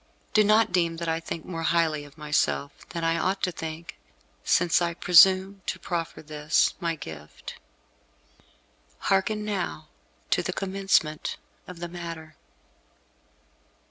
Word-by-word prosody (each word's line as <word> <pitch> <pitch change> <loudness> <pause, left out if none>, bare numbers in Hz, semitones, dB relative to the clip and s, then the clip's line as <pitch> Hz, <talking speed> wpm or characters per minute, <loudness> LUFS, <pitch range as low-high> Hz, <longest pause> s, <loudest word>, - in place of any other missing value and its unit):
Do 215 - +6
not 215 +1 +4
deem 170 -2 +1
that 170 0 -4
I 165 0 0
think 165 -1 -6
more 165 -3 -5
highly 160 -3 +1
of 145 +1 -17
myself 150 -1 0 0.2
than 170 -1 -4
I 165 0 +1
ought 190 +1 -1
to 180 - +1
think, 165 0 -7 0.4
since 175 0 +3
I 170 -1 -1
presume 190 +3 +5
to - - -2
proffer 165 -3 -4
this, 150 0 +1
my 170 -2 -1
gift." 75 - -9 1.4
Hearken 210 +2 0
now 190 - -3 0.4
to - - +3
the - - -3
commencement 190 -5 0 0.3
of 180 - -9
the 175 - -3
matter. 165 -2 -8
170 Hz, 135 wpm, -26 LUFS, 155-190 Hz, 1.4 s, Do